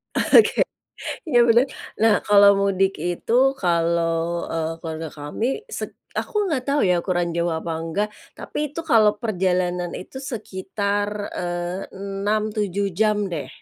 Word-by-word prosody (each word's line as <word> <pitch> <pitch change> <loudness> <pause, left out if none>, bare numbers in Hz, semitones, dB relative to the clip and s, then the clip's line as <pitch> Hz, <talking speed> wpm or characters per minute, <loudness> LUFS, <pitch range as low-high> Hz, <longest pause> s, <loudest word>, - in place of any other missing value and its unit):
Oke. 450 - +5 0.6
Ya, 285 -7 +2
bener. 235 +3 +6 0.4
Nah, 225 -2 +6
kalau 200 -1 +7
mudik 195 -1 +2
itu, 175 +6 -3 0.3
kalau, 170 0 +1
eee, 165 0 -1
keluarga 160 0 -4
kami, 150 +10 -4 0.2
set - - -5 0.2
aku - - -4
nggak 275 -6 0
tahu 285 +1 +2
ya, 180 -1 +3
ukuran 175 -1 0
jauh 170 0 +1
apa 160 +1 -3
enggak, 180 +6 -1 0.3
tapi - - -7
itu 330 - -4
kalau 220 -8 +5
perjalanan 180 -4 0
itu, 260 +8 -8
sekitar, 205 -4 -3 0.2
eee, 175 +1 -3 0.2
6-7 200 0 -1
jam 210 +3 +2 0.2
deh, 155 - -4
190 Hz, 130 wpm, -23 LUFS, 170-210 Hz, 0.6 s, kalau